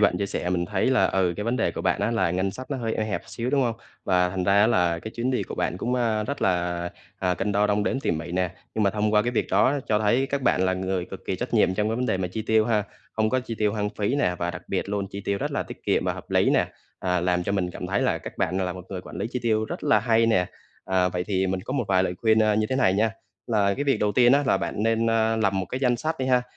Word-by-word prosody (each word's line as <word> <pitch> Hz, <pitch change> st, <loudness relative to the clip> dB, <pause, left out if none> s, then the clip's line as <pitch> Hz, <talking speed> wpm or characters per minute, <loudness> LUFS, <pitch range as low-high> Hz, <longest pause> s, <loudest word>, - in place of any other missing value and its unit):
bạn 95 Hz, -4 st, +3 dB
chia 100 Hz, -, -1 dB
sẻ 90 Hz, -, -3 dB
mình 85 Hz, -1 st, 0 dB
thấy 95 Hz, -1 st, 0 dB
là, 130 Hz, -, +4 dB
ừ, 90 Hz, -2 st, +1 dB
cái 105 Hz, -, -3 dB
vấn 120 Hz, +2 st, 0 dB
đề -, -, +1 dB
của -, -, -5 dB
bạn -, -, 0 dB
á -, -, +1 dB
là 95 Hz, -7 st, +1 dB
ngân 95 Hz, +2 st, 0 dB
sách 130 Hz, +6 st, -9 dB
nó 140 Hz, -, -1 dB
hơi 115 Hz, -3 st, -2 dB
eo 110 Hz, -, -1 dB
hẹp 105 Hz, -, -3 dB
xíu, 120 Hz, +1 st, -4 dB
đúng 140 Hz, 0 st, +2 dB
hông? 120 Hz, -3 st, 0 dB, 0.3 s
Và 90 Hz, -1 st, +3 dB
thành 90 Hz, 0 st, -2 dB
ra 100 Hz, -, +3 dB
á 105 Hz, -, +6 dB
là 90 Hz, -7 st, +2 dB
cái 110 Hz, -, -7 dB
chuyến 120 Hz, +3 st, -2 dB
đi 130 Hz, -, 0 dB
của -, -, -6 dB
bạn 90 Hz, -, -1 dB
cũng, 120 Hz, +6 st, -1 dB
a, 115 Hz, -4 st, +1 dB
rất 140 Hz, +5 st, -4 dB
là, 85 Hz, -1 st, 0 dB, 0.3 s
à, 90 Hz, -1 st, +1 dB
cân 95 Hz, +4 st, -2 dB
đo 105 Hz, +1 st, +3 dB
đong 105 Hz, 0 st, +1 dB
đếm 135 Hz, -, 0 dB
tỉ -, -, 0 dB
mỉ 85 Hz, +1 st, -3 dB
nè. 90 Hz, -1 st, 0 dB, 0.2 s
Nhưng 110 Hz, -, 0 dB
mà 100 Hz, -, +4 dB
thông 105 Hz, +1 st, 0 dB
qua 105 Hz, -, +5 dB
cái 120 Hz, -, -1 dB
việc 125 Hz, -, 0 dB
đó 105 Hz, +8 st, +4 dB
cho 105 Hz, -, +3 dB
thấy 120 Hz, +6 st, +2 dB
các 140 Hz, 0 st, -2 dB
bạn 120 Hz, -, +2 dB
là 95 Hz, -, +2 dB
người 95 Hz, -1 st, -2 dB
cực -, -, -10 dB
kỳ -, -, -2 dB
trách -, -, -4 dB
nhiệm 95 Hz, -, +3 dB
trong 105 Hz, +2 st, 0 dB
cái 110 Hz, -, -1 dB
vấn 125 Hz, +1 st, -1 dB
đề 95 Hz, -, +1 dB
mà 95 Hz, -1 st, -2 dB
chi 110 Hz, +5 st, -4 dB
tiêu 110 Hz, 0 st, +3 dB
ha, 110 Hz, -3 st, +1 dB, 0.3 s
hông 110 Hz, 0 st, +1 dB
có 130 Hz, -, +2 dB
chi 120 Hz, -2 st, -6 dB
tiêu 105 Hz, -1 st, +2 dB
hoang 105 Hz, -1 st, -1 dB
phí 105 Hz, +3 st, -1 dB
nè 90 Hz, -11 st, +1 dB
và 85 Hz, 0 st, -1 dB
đặc 90 Hz, 0 st, -8 dB
biệt 95 Hz, 0 st, -2 dB
luôn, 100 Hz, -1 st, -2 dB
chi 100 Hz, -, -6 dB
tiêu 100 Hz, 0 st, 0 dB
rất -, -, -2 dB
là -, -, 0 dB
tiết -, -, -11 dB
kiệm -, -, +1 dB
và -, -, +1 dB
hợp -, -, -11 dB
lý -, -, +3 dB
nè, -, -, +3 dB, 0.3 s
à, 90 Hz, -1 st, 0 dB
làm 90 Hz, 0 st, +1 dB
cho 95 Hz, -, -2 dB
mình 95 Hz, -3 st, 0 dB
cảm -, -, -6 dB
thấy -, -, 0 dB
là -, -, +1 dB
các -, -, -9 dB
bạn, 95 Hz, +1 st, 0 dB
à, -, -, 0 dB
là 90 Hz, -, -2 dB
một 90 Hz, 0 st, -9 dB
người 95 Hz, -2 st, -5 dB
quản -, -, -10 dB
lý -, -, -2 dB
chi 125 Hz, -, -2 dB
tiêu 110 Hz, -2 st, +1 dB
rất -, -, -6 dB
là 110 Hz, -, +4 dB
hay 115 Hz, 0 st, +3 dB
nè. 95 Hz, -6 st, +3 dB, 0.4 s
À, 95 Hz, -1 st, +2 dB
vậy 90 Hz, 0 st, -3 dB
thì 95 Hz, -1 st, 0 dB
mình 95 Hz, 0 st, -1 dB
có 130 Hz, -, -6 dB
một 130 Hz, -3 st, 0 dB
vài 95 Hz, -1 st, +3 dB
lời 90 Hz, -, -1 dB
khuyên, 110 Hz, -1 st, +4 dB
a, 105 Hz, -1 st, +3 dB
như 110 Hz, 0 st, +1 dB
thế 130 Hz, -, +1 dB
này 125 Hz, -8 st, +3 dB
nha, 110 Hz, +3 st, +2 dB, 0.4 s
là 100 Hz, -4 st, +2 dB
cái 145 Hz, -, -2 dB
việc 140 Hz, -, +2 dB
đầu 105 Hz, -1 st, +1 dB
tiên 120 Hz, +1 st, +5 dB
á 140 Hz, +1 st, +4 dB
là -, -, +4 dB
bạn 105 Hz, -, -3 dB
nên, 115 Hz, +1 st, +2 dB
a, 115 Hz, 0 st, +2 dB
lập 105 Hz, -3 st, +2 dB
một 95 Hz, -1 st, -1 dB
cái 130 Hz, -, -4 dB
danh 125 Hz, -3 st, +2 dB
sách 160 Hz, +5 st, -3 dB
đi 130 Hz, -, -1 dB
ha, 125 Hz, -1 st, +3 dB
105 Hz, 325 wpm, -25 LUFS, 95-115 Hz, 0.4 s, á